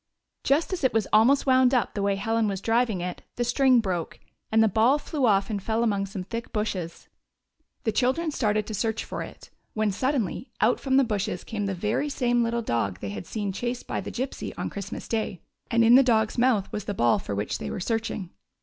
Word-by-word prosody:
Just 305 +7 +1
as 355 - -4
it 260 - +3
was 220 -3 +2
almost 235 +6 +5
wound 260 -1 +4
up 245 - +1
the 205 - -3
way 200 0 +1
Helen 225 +2 0
was 195 -2 -2
driving 225 -2 +1
it 180 0 -5
the 240 - 0
string 255 +1 +4
broke, 180 -6 -3 0.3
and 220 0 +5
the - - +5
ball 225 +7 +3
flew 290 -3 -1
off 200 0 +2
and 205 -2 -2
fell 225 +3 0
among 200 -3 0
some 190 -1 -5
thick 230 +4 -6
bushes. 190 -6 -3 0.8
The 220 - +1
children 265 +9 +1
started 215 -6 0
to 220 - -6
search 220 +2 -1
for - - -5
it, - - -10 0.2
when 215 -1 +1
suddenly 255 +1 -1
out 225 +3 +3
from 265 -1 +1
the 275 - +6
bushes 210 -5 -2
came 205 -2 -3
the 195 - -2
very 210 +10 -1
same 245 -3 +1
little 235 0 0
dog 100 - -1
they 100 -1 -5
had 100 -2 -7
seen 205 -3 -3
chased 240 +5 -4
by - - -3
the - - -6
Gypsy 260 +2 -4
on - - -3
Christmas 200 0 -6
day, 220 -5 -2 0.3
and 230 0 +3
in 230 - +7
the 260 - +9
dog's 220 -4 +2
mouth 235 -6 +2
was 210 - -4
the 205 - -3
ball 120 -6 +3
for 100 - -5
which 100 +1 -2
they - - -5
were - - -4
searching. 220 -3 -2
220 Hz, 220 wpm, -26 LUFS, 200-245 Hz, 0.8 s, the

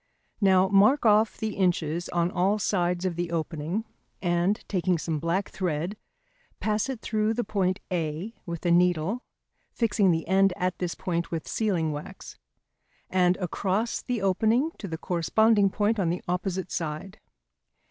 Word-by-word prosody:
Now 190 -1 +5
mark 205 +8 +4
off 215 0 +4
the 220 -1 -3
inches 175 -3 0
on 175 0 0
all 195 +4 +2
sides 180 -3 0
of 180 -2 -1
the 175 0 -2
opening, 165 +5 -2 0.3
and 175 +3 +1
taking 185 -2 +1
some 160 -1 -2
black 170 +5 -1
thread, 175 +1 -2 0.6
pass 215 +3 0
it 255 -4 -4
through 215 0 0
the 240 - 0
point 190 -2 0
A 170 +4 -2
with 170 0 -5
a 175 - +3
needle 180 +5 +2 0.5
(fixing 210 -4 +2
the 165 -2 0
end 195 +1 +4
at 180 0 -1
this 180 -2 -2
point 170 -2 -2
with 165 -2 -4
sealing 180 -8 0
wax), 145 0 -8 0.8
and 180 -1 +3
across 195 +5 -1
the 245 -5 -3
opening 220 - +2
to 200 - -5
the 165 -2 -4
corresponding 200 +5 +3
point 210 +3 0
on 175 -4 +1
the 175 - -2
opposite 180 0 -2
side. 160 +4 -4
185 Hz, 155 wpm, -27 LUFS, 170-210 Hz, 0.8 s, Now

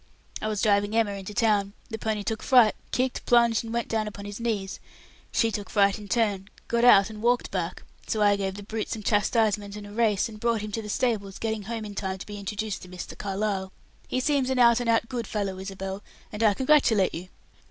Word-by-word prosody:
"I - - -2
was 215 -2 -1
driving 205 0 +2
Emma 225 -3 +2
into 200 +1 -7
town. 210 -4 +2 0.2
The 220 - -4
pony 215 -1 -2
took 220 +1 -3
fright, 245 -5 +5 0.2
kicked, 255 0 -1
plunged 235 -2 +4
and 225 - -7
went 235 0 -1
down 220 -1 -1
upon 205 -1 -8
his 205 +1 -7
knees; 210 -5 -2 0.5
she 230 -1 +2
took 205 -2 -5
fright 200 0 +3
in 205 - -10
turn, 205 -4 0 0.2
got 235 0 +1
out, 210 -3 +7
and 215 -1 -9
walked 240 +1 +1
back. 180 -2 -3 0.2
So 220 - -1
I 205 0 +5
gave 195 -1 -3
the 205 - -8
brute 220 +1 -4
some 220 - -4
chastisement 205 -1 +1
and 210 -1 -8
a 205 - -10
race, 215 -2 +2
and 215 -2 -11
brought 230 -1 +1
him 210 0 -5
to 225 - -3
the 210 - -8
stables, 205 -4 -1
getting 220 -1 -2
home 225 0 -4
in 205 - -7
time 190 -1 -3
to 190 - -8
be 205 -1 -7
introduced 210 +1 -4
to - - -10
Mr. 180 0 -8
Carlyle. 195 -1 -2 0.4
He 255 - -1
seems 270 -1 +1
an 260 - 0
out 235 -1 +6
and 240 -1 -1
out 230 0 +2
good 235 -4 -4
fellow, 195 -3 -3
Isabel, 195 0 -5 0.3
and 210 - -5
I 215 -3 +4
congratulate 255 -8 +3
you." 180 +3 -7
210 Hz, 225 wpm, -26 LUFS, 200-230 Hz, 0.5 s, out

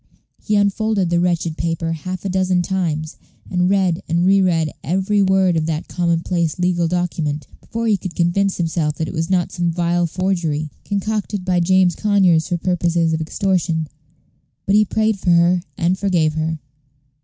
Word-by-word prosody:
He 210 - 0
unfolded 205 -2 +1
the 170 - +3
wretched 170 -2 0
paper 165 0 -2
half 180 +4 -5
a - - -1
dozen 185 -1 +1
times, 160 -5 -2 0.3
and 180 0 +1
read 190 -4 +1
and 170 +2 +1
reread 185 -5 +3
every 190 +4 +1
word 190 -2 +3
of 160 -1 0
that 160 0 -3
commonplace 170 -1 -1
legal 175 -1 +1
document, 160 -4 -2
before 230 +1 -5
he 215 -3 +3
could 185 -1 -7
convince 185 +3 +1
himself 160 -3 -1
that 160 - -3
it - - -6
was 165 -1 -2
not 180 -2 +1
some 175 -1 -1
vile 175 0 0
forgery, 165 -5 -2
concocted 205 -1 -2
by 180 -1 +2
James 185 0 +3
Conyers 190 -6 +3
for 175 - -1
purposes 170 -2 0
of 160 - -1
extortion. 165 -1 -1 0.8
But 195 - +1
he 210 +1 +5
prayed 220 0 0
for 185 - -1
her, 175 +1 +4 0.2
and 175 +2 +1
forgave 175 -6 +1
her. 160 +1 -2
175 Hz, 165 wpm, -19 LUFS, 165-190 Hz, 0.8 s, he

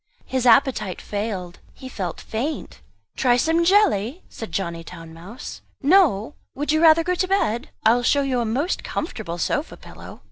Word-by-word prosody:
His 260 -1 -1
appetite 225 -5 +3
failed, 200 -4 -5 0.2
he 260 - -10
felt 190 -9 -5
faint. 275 +8 -5 0.3
"Try 245 -2 +3
some 325 +6 +2
jelly?" 345 - +2
said 225 - -8
Johnny 170 -3 -3
Town 165 -1 -11
mouse. 185 +9 -9 0.2
"No? 290 - +4 0.2
Would 290 +2 -1
you 310 +1 +2
rather 330 0 +6
go 360 +2 0
to 370 +1 0
bed? 295 - 0 0.2
I 220 - +7
will 245 - +1
show 280 +3 +2
you 260 -2 0
a 235 - 0
most 270 +11 -1
comfortable 215 - -4
sofa 290 - -2
pillow." - - -12
245 Hz, 170 wpm, -22 LUFS, 205-315 Hz, 0.3 s, I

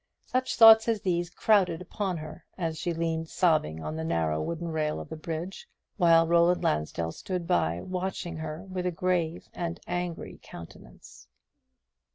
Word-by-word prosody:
Such 255 0 -1
thoughts 225 -1 +9
as 225 -3 0
these 175 -2 0
crowded 185 -3 +2
upon 185 0 -3
her, 155 +2 -9
as 165 -3 -3
she 175 - -1
leaned 165 -1 -2
sobbing 155 - +1
on 75 0 -4
the 80 - -3
narrow 80 -1 0
wooden 170 - -4
rail 155 -1 -1
of - - -9
the 160 - -5
bridge; 165 - -6 0.3
while 165 -3 +5
Roland 170 +1 +3
Lansdell 75 +2 -1
stood 180 - -4
by, 85 - +1
watching 185 -2 -4
her 160 +2 -6
with 185 -2 -4
a - - 0
grave 175 -1 -1
and 170 0 -4
angry 175 -1 -4
countenance. 85 - -13
170 Hz, 160 wpm, -28 LUFS, 155-180 Hz, 0.3 s, thoughts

